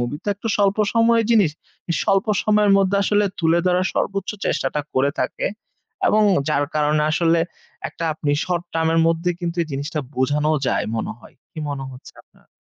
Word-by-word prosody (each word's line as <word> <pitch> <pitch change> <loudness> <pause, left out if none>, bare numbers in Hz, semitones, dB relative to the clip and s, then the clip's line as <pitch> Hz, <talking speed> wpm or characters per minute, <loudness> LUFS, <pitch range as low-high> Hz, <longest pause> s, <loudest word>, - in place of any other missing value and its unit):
movie 120 +4 -3
তো - - -3
একটা 205 +3 -6
স্বল্প 200 -1 +2 0.2
সময়ের 230 0 +4
জিনিস। 210 -9 +4 0.5
স্বল্প 195 0 +2 0.2
সময়ের 210 -1 +3
মধ্যে 195 0 +2
আসলে 205 +1 +2 0.2
তুলে 165 0 +3
ধরার 180 0 +2
সর্বোচ্চ 195 -1 -1
চেষ্টাটা 135 +2 -1
করে 135 +2 +2
থাকে। - - -2 0.6
এবং 215 0 +4 0.3
যার 145 -1 +2
কারণে 150 0 +2
আসলে 165 +1 +2 0.5
একটা 165 - -6
আপনি 150 -1 -2
short-term 170 -2 -2
এর - - +3
মধ্যে 165 +2 +1
কিন্তু 170 -1 -3
এই - - -5
জিনিসটা 145 +3 -3
বোঝানোও 150 +4 +1
যায় - - 0
মনে 110 - -3
হয়। - - -17 0.2
কি 170 - -10
মনে 140 -2 -4
হচ্ছে 125 - -13
আপনার? - - -29
165 Hz, 170 wpm, -21 LUFS, 150-195 Hz, 0.6 s, সময়ের